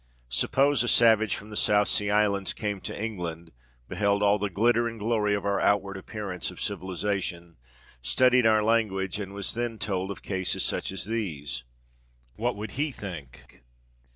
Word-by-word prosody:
Suppose 135 - +2
a 120 - 0
savage 110 -3 +4
from 105 +1 -10
the - - -7
South 105 -1 +4
Sea 105 -1 +1
Islands 100 -2 +2
came 105 -3 -3
to - - -5
England—beheld 85 - -3
all 105 0 +4
the 105 0 -1
glitter 115 +5 +2
and 115 -1 -6
glory 105 -1 +1
of 100 - -4
our 100 0 +1
outward 100 -1 +2
appearance 95 -2 -5
of - - -11
civilisation—studied 85 - -1
our 110 -1 +4
language, 105 -4 +1
and 100 -2 -5
was 100 - -3
then 120 -1 -2
told 95 -3 -2
of 100 - -4
such - - -17
cases 95 -2 -1
as 95 -2 -2
these? 75 - -4 0.7
What 120 +3 -1
would 105 0 -6
he 145 +3 -1
think. 85 - -9
100 Hz, 155 wpm, -27 LUFS, 90-110 Hz, 0.7 s, savage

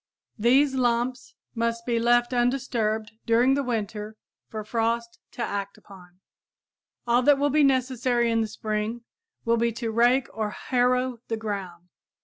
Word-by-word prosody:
These 265 +5 +4
lumps 245 0 -1 0.2
must 230 0 -2
be 235 -1 0
left 240 +1 +3
undisturbed 240 -3 0 0.2
during 240 +3 +4
the 280 - +1
winter 215 -3 -4 0.3
for 215 -1 -6
frost 230 +1 -2
to 240 - -3
act 200 -2 -4
upon. 180 -2 -16 0.9
All 240 +1 +3
that 285 +2 +5
will 285 +1 +1
be 300 +1 +4
necessary 255 -3 +1
in 225 0 +2
the 220 - -1
spring 215 +2 -3 0.4
will 230 0 +2
be 235 0 +1
to 230 0 -3
rake 240 +3 +3
or 215 -1 -2
harrow 250 +3 0
the 225 - -2
ground. 195 -5 -6
235 Hz, 145 wpm, -25 LUFS, 220-250 Hz, 0.9 s, that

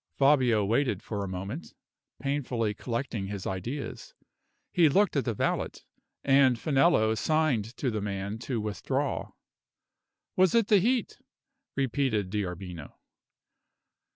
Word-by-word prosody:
Fabio 130 -7 +4
waited 115 -2 +1
for 105 -3 -3
a - - -3
moment, 95 - -6 0.4
painfully 125 -5 -1
collecting 115 -2 -3
his 100 -1 -5
ideas. 130 - -5 0.6
He 170 -5 +5
looked 195 +4 +3
at 140 - +1
the 115 -4 -1
valet, - - 0 0.5
and 135 -3 +5
Finello 135 -4 +3
signed 130 -4 0
to 130 - -1
the 110 -1 -2
man 100 +1 -3
to 120 -1 -3
withdraw. 130 +6 -2 1.0
"Was 185 +1 +4
it 230 -1 +3
the 210 -3 +6
heat?" 240 +6 0 0.6
repeated 130 -7 0
D'Arbino. 90 -5 -5
120 Hz, 120 wpm, -28 LUFS, 105-145 Hz, 1.0 s, the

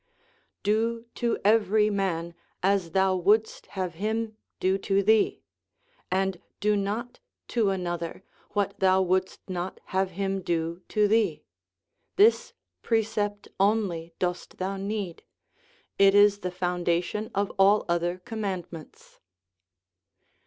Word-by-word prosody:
Do 225 +3 0
to 235 -1 0
every 210 0 +4
man 170 -4 -1 0.3
as 190 -4 +1
thou 190 0 +3
wouldst 210 +5 +2
have 185 -2 -2
him 220 +4 -2 0.2
do 190 +1 +1
to 195 0 +1
thee; 220 +1 +3 0.7
and 190 -1 0 0.2
do 210 0 +2
not 215 +5 -3 0.3
to 225 -4 +2
another 175 -2 -3 0.3
what 200 -1 -1
thou 190 0 +4
wouldst 185 +1 -1
not 185 -1 -4
have 190 0 +2
him 195 -1 -1
do 170 0 -2
to 210 -1 +3
thee. 220 +1 +1 0.7
This 425 +4 +4 0.3
precept 215 -2 -1
only 190 -5 +1
dost 180 -1 -3
thou 190 +1 -2
need; 195 -3 -4 0.8
it 195 0 +6
is 205 0 +6
the 185 - -3
foundation 180 +3 -1
of 200 0 0
all 200 +2 +5
other 175 +1 0
commandments." 185 -6 -7
195 Hz, 115 wpm, -27 LUFS, 180-210 Hz, 0.8 s, it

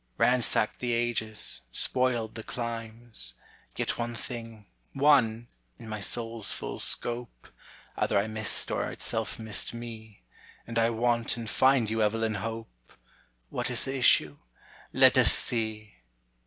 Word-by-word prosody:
Ransacked 125 -3 +1
the 120 -1 -2
ages, 115 -2 +2
spoiled 120 - +1
the 115 - -7
climes; 115 - -1 0.4
Yet - - -3
one 120 0 -4
thing 115 -4 -9 0.3
one 125 -5 +2 0.3
in 115 - -13
my 110 -1 -6
soul's 115 0 +1
full - - -6
scope, 120 - +1 0.5
Either - - -1
I 100 - +1
missed 110 -1 +1
or - - -2
itself 110 0 -2
missed 110 0 -3
me, 110 - -11 0.4
And 115 0 -3
I 115 0 +2
want 115 0 -1
and 115 -1 -7
find 130 +2 +2
you, 110 +1 -2
Evelyn 110 +1 -1
Hope! 110 - -9 0.6
What - - -3
is - - +3
the 135 - -4
issue? 75 - +3 0.5
let - - +5
us - - +6
see! 110 -2 -2
115 Hz, 135 wpm, -27 LUFS, 110-120 Hz, 0.6 s, us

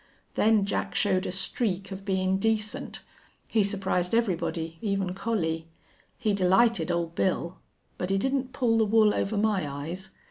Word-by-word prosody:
Then 215 -2 +3
Jack 95 - -2
showed 185 +1 +2
a - - -2
streak 195 +1 -1
of 195 0 -7
bein' 190 -1 +1
decent. 215 0 -1 0.5
He 220 -2 +2
surprised 190 -1 0
everybody, 170 -6 -1
even 195 -3 -1
Collie. 165 -6 -2 0.5
He 215 -4 0
delighted 190 -1 +3
Old 170 -1 -1
Bill. 175 0 -1 0.4
But 180 - -2
he 195 - +2
didn't 265 +4 0
pull 230 -4 +2
the 220 - +4
wool 215 0 +4
over 205 +2 -1
my 205 -7 +1
eyes. 165 +7 -5
195 Hz, 150 wpm, -27 LUFS, 180-220 Hz, 0.5 s, the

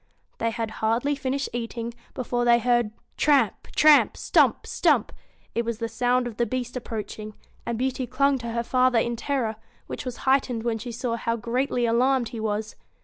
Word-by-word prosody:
They 230 - +1
had 225 -1 -3
hardly 230 +6 +1
finished 275 0 -2
eating, 235 0 -4 0.2
before 245 -1 -1
they 240 0 +5
heard 240 -2 +2 0.3
tramp, 275 -9 +2
tramp! 300 -1 +6
gtumo. - - +3
stumpj - - +2 0.4
It 235 - 0
was 230 -1 -3
the 230 0 -2
sound 245 +2 +1
of 235 -3 -6
the 235 - +1
beast 250 -1 -3
approaching; 215 -3 -6 0.3
and 235 -1 -1
Beauty 260 0 -1
clung 275 +2 +2
to 235 - -6
her 235 +1 -1
father 255 0 +3
in 235 +1 +1
terror, 235 -3 -2 0.3
which - - -6
was 250 -3 -5
heightened 260 -4 +2
when 230 -2 -1
she 240 +2 -6
saw 235 0 -2
how 230 0 -1
greatly 245 +2 -1
alarmed 245 +1 +2
he 235 -2 -7
was. 215 0 -2
240 Hz, 180 wpm, -25 LUFS, 230-255 Hz, 0.4 s, tramp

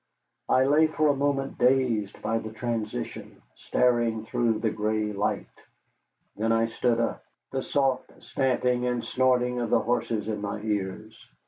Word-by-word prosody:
I 130 - +4
lay 150 +3 +5
for 155 -1 +1
a 145 - +3
moment 135 -1 -1
dazed 125 -5 +1
by 115 0 0
the 110 -1 -7
transition, 110 - -4
staring 120 -3 +1
through 115 -1 +1
the 110 0 0
gray 105 0 -1
light. 100 +1 -1 0.9
Then 110 +2 0
I 115 0 +3
sat 115 +1 0
up, 115 - -1 0.3
the 135 - -1
soft 135 -2 0
stamping 125 -2 0
and 125 -1 -1
snorting 125 -1 +2
of 120 -2 -2
the 115 - +4
horses 115 -2 -1
in 105 -2 -3
my 100 0 -3
ears. 105 0 -4
115 Hz, 150 wpm, -27 LUFS, 110-130 Hz, 0.9 s, lay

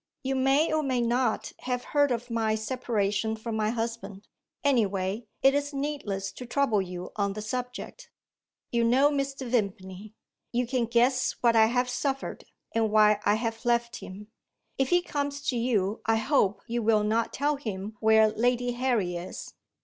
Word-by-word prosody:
You 270 0 -1
may, 270 +4 +3
or 310 - +2
may 260 -4 0
not, 240 +2 0
have 250 -1 -3
heard 290 -1 +4
of 240 0 -3
my 220 -1 +1
separation 220 -2 -1
from 220 0 -5
my 215 -1 +1
husband. 225 -4 -4 0.4
Anyway, 210 -5 +1 0.2
it 270 0 +6
is 285 0 -1
needless 275 -10 -3
to 250 - -9
trouble 240 -6 +2
you 180 -1 -6
on 200 -1 0
the 215 - -5
subject; 250 - -5 0.6
you 235 -1 +2
know 260 +5 +4
Mr. 275 -1 -2
Vimpany; 200 -3 -3 0.4
you 245 +1 0
can 245 -1 0
guess 245 +3 +2
what 235 -1 +4
I 220 -1 +6
have 245 +2 +1
suffered, 270 +2 -3 0.3
and 225 -1 +2
why 210 -1 +5
I 205 - +5
have 225 0 -3
left 235 -1 +1
him. 205 +3 -10 0.5
If 265 -1 +2
he 355 0 +3
comes 285 -3 -3
to 255 - 0
you, 220 -4 0
I 225 - +4
hope 220 -4 +1
you 235 0 -2
will 215 -1 +3
not 225 +2 0
tell 290 +1 0
him 215 -5 -5
where 220 0 +5
Lady 245 +2 +1
Harry 240 -8 0
is." 175 +2 -8
235 Hz, 170 wpm, -27 LUFS, 215-260 Hz, 0.6 s, it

